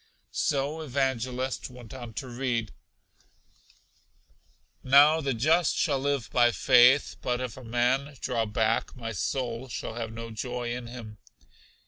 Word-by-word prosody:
So 145 Hz, +3 st, -1 dB
Evangelist 130 Hz, -3 st, -2 dB
went 125 Hz, -2 st, -12 dB
on 120 Hz, -4 st, -9 dB
to 135 Hz, -, -5 dB
read, 120 Hz, -3 st, -2 dB, 2.1 s
'Now 145 Hz, +4 st, +6 dB
the 135 Hz, -4 st, -1 dB
just 160 Hz, +9 st, +2 dB
shall 140 Hz, -4 st, +1 dB
live 140 Hz, -2 st, -1 dB
by 120 Hz, -1 st, +4 dB
faith, 130 Hz, +3 st, +5 dB
but 125 Hz, -1 st, -1 dB
if 125 Hz, -3 st, -4 dB
a 130 Hz, -, -11 dB
man 125 Hz, +5 st, 0 dB
draw 115 Hz, -4 st, -1 dB
back, 110 Hz, +2 st, 0 dB
my 115 Hz, -2 st, -5 dB
soul 120 Hz, +3 st, -3 dB
shall 115 Hz, -, -5 dB
have 115 Hz, -1 st, -5 dB
no 115 Hz, 0 st, -7 dB
joy 120 Hz, +1 st, -4 dB
in 125 Hz, -1 st, -6 dB
him.' 115 Hz, -3 st, -9 dB
125 Hz, 135 wpm, -28 LUFS, 115-135 Hz, 2.1 s, Now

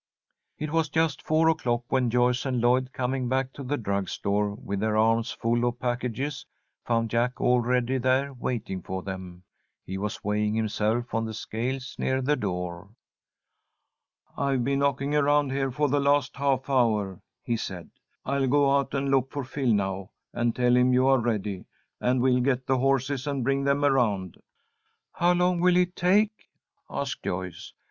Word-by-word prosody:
It 155 Hz, -1 st, -4 dB
was 160 Hz, -1 st, +1 dB
just 160 Hz, -2 st, 0 dB
four 160 Hz, +1 st, +2 dB
o'clock 125 Hz, -7 st, +1 dB
when 130 Hz, -2 st, +2 dB
Joyce 125 Hz, +1 st, +2 dB
and 130 Hz, -2 st, 0 dB
Lloyd, 125 Hz, +2 st, +2 dB
coming 130 Hz, 0 st, -2 dB
back 130 Hz, 0 st, 0 dB
to -, -, -9 dB
the 140 Hz, +2 st, -2 dB
drug 100 Hz, -5 st, -2 dB
store 100 Hz, 0 st, -1 dB
with 100 Hz, -1 st, -4 dB
their 110 Hz, +1 st, 0 dB
arms 115 Hz, +2 st, +2 dB
full 120 Hz, +1 st, 0 dB
of 120 Hz, 0 st, -1 dB
packages, 125 Hz, +3 st, -2 dB, 0.4 s
found 115 Hz, -2 st, 0 dB
Jack 120 Hz, +2 st, 0 dB
already 125 Hz, +1 st, +2 dB
there 130 Hz, +2 st, +1 dB
waiting 120 Hz, -7 st, -4 dB
for 95 Hz, +2 st, -5 dB
them. 95 Hz, -2 st, -7 dB, 0.4 s
He 95 Hz, +1 st, -5 dB
was 105 Hz, +1 st, -4 dB
weighing 105 Hz, +1 st, 0 dB
himself 110 Hz, +2 st, -1 dB
on 115 Hz, -1 st, 0 dB
the 110 Hz, -1 st, -5 dB
scales 130 Hz, +5 st, -4 dB
near 130 Hz, 0 st, +1 dB
the 140 Hz, +3 st, +1 dB
door. 90 Hz, -3 st, -4 dB, 1.5 s
"I've 135 Hz, -3 st, 0 dB
been 140 Hz, +2 st, 0 dB
knocking 140 Hz, 0 st, 0 dB
around 145 Hz, -1 st, +3 dB
here 135 Hz, 0 st, 0 dB
for 145 Hz, +4 st, 0 dB
the 145 Hz, +1 st, +1 dB
last 140 Hz, -1 st, +2 dB
half 135 Hz, -2 st, 0 dB
hour," 110 Hz, -8 st, +1 dB, 0.2 s
he 120 Hz, -, -1 dB
said. 95 Hz, -6 st, -6 dB, 0.3 s
"I'll 140 Hz, 0 st, 0 dB
go 140 Hz, +1 st, +4 dB
out 140 Hz, 0 st, 0 dB
and 135 Hz, 0 st, 0 dB
look 135 Hz, -1 st, +2 dB
for 140 Hz, -1 st, -3 dB
Phil 130 Hz, -1 st, -1 dB
now, 95 Hz, -2 st, -1 dB, 0.2 s
and 120 Hz, -1 st, 0 dB
tell 125 Hz, 0 st, +3 dB
him 125 Hz, 0 st, +4 dB
you 130 Hz, +1 st, +4 dB
are 135 Hz, -1 st, +5 dB
ready, 105 Hz, -5 st, -2 dB, 0.3 s
and 125 Hz, 0 st, +1 dB
we'll 125 Hz, -1 st, +3 dB
get 130 Hz, 0 st, 0 dB
the 130 Hz, 0 st, +1 dB
horses 135 Hz, +1 st, 0 dB
and 140 Hz, -3 st, -1 dB
bring 135 Hz, +2 st, 0 dB
them 140 Hz, +1 st, +2 dB
around." 105 Hz, -, +1 dB, 0.7 s
"How 175 Hz, +1 st, +3 dB
long 180 Hz, 0 st, +2 dB
will 180 Hz, 0 st, +4 dB
it 180 Hz, 0 st, +1 dB
take?" 205 Hz, +4 st, +1 dB, 0.4 s
asked -, -, -3 dB
Joyce. 90 Hz, -1 st, -5 dB
125 Hz, 170 wpm, -26 LUFS, 110-140 Hz, 1.5 s, are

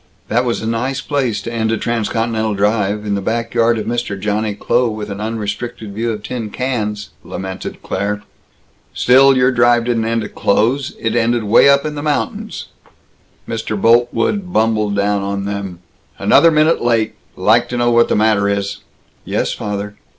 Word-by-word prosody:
"That 120 Hz, +3 st, +1 dB
was 120 Hz, -2 st, -1 dB
a -, -, -2 dB
nice 125 Hz, +4 st, -1 dB
place 130 Hz, -7 st, -1 dB
to 115 Hz, -, -5 dB
end 110 Hz, -1 st, 0 dB
a 115 Hz, -, +1 dB
transcontinental 115 Hz, -1 st, -1 dB
drive 105 Hz, 0 st, 0 dB
in 105 Hz, -, -1 dB
the 100 Hz, -, -1 dB
back 115 Hz, +3 st, -2 dB
yard 115 Hz, 0 st, +3 dB
of 110 Hz, -, -3 dB
Mr. 120 Hz, -4 st, -3 dB
Johnny 105 Hz, +1 st, -1 dB
Kloh, 120 Hz, +3 st, +1 dB
with 105 Hz, -1 st, -5 dB
an 100 Hz, +1 st, -5 dB
unrestricted 110 Hz, 0 st, -4 dB
view 115 Hz, +3 st, -1 dB
of 105 Hz, -2 st, -6 dB
tin 115 Hz, -4 st, -4 dB
cans!" 105 Hz, -4 st, -3 dB
lamented 95 Hz, 0 st, -7 dB
Claire. 105 Hz, +2 st, -2 dB, 0.7 s
"Still, 135 Hz, +2 st, +5 dB
your 125 Hz, +1 st, +4 dB
drive 120 Hz, -1 st, +3 dB
didn't 115 Hz, -2 st, 0 dB
end 115 Hz, 0 st, 0 dB
at 105 Hz, -, -8 dB
Kloh's; 120 Hz, +7 st, +1 dB
it 115 Hz, -, -1 dB
ended 120 Hz, 0 st, +1 dB
way 110 Hz, +6 st, +5 dB
up 140 Hz, +1 st, +4 dB
in 155 Hz, -, -3 dB
the 145 Hz, -, -5 dB
mountains." 150 Hz, -1 st, -3 dB, 0.8 s
Mr. 110 Hz, -2 st, -3 dB
Boltwood 120 Hz, -, +2 dB
bumbled 110 Hz, -, +1 dB
down 100 Hz, 0 st, +1 dB
on 100 Hz, 0 st, -3 dB
them: 100 Hz, -3 st, -5 dB, 0.4 s
"Another 165 Hz, -, +5 dB
minute 155 Hz, +1 st, +3 dB
late! 115 Hz, -2 st, +1 dB, 0.2 s
Like -, -, +3 dB
to 125 Hz, -, -3 dB
know 120 Hz, 0 st, +2 dB
what 120 Hz, 0 st, +4 dB
the -, -, +2 dB
matter 105 Hz, -2 st, +2 dB
is!" 100 Hz, 0 st, -2 dB, 0.5 s
"Yes, -, -, -1 dB
father!" 105 Hz, 0 st, -5 dB
115 Hz, 175 wpm, -17 LUFS, 105-120 Hz, 0.8 s, Still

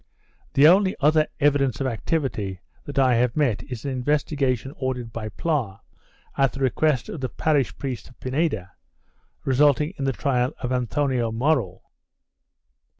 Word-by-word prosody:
The 140 Hz, +2 st, +7 dB
only 190 Hz, +3 st, +5 dB
other 155 Hz, +2 st, +3 dB
evidence 140 Hz, -4 st, +2 dB
of 135 Hz, -, -1 dB
activity 115 Hz, -, -2 dB, 0.3 s
that 145 Hz, -, -7 dB
I 130 Hz, -2 st, +4 dB
have 125 Hz, +1 st, +1 dB
met 125 Hz, -9 st, +1 dB
is 125 Hz, -3 st, -8 dB
an 140 Hz, -, -1 dB
investigation 135 Hz, -1 st, 0 dB
ordered 125 Hz, -3 st, -3 dB
by 110 Hz, -2 st, -5 dB
Pla, 120 Hz, -, -2 dB, 0.6 s
at 135 Hz, -1 st, +2 dB
the 135 Hz, -, -7 dB
request 135 Hz, -1 st, +1 dB
of 155 Hz, -, -6 dB
the 130 Hz, -, -2 dB
parish 145 Hz, -6 st, 0 dB
priest 130 Hz, -7 st, -5 dB
of 125 Hz, -, -21 dB
Pineda, 130 Hz, -, -1 dB, 0.7 s
resulting 145 Hz, +4 st, +3 dB
in 135 Hz, -, -1 dB
the 135 Hz, -, +2 dB
trial 125 Hz, +2 st, 0 dB
of 125 Hz, -1 st, -3 dB
Anthoni 130 Hz, +2 st, 0 dB
Morell. 115 Hz, -, 0 dB
135 Hz, 150 wpm, -24 LUFS, 120-145 Hz, 0.7 s, The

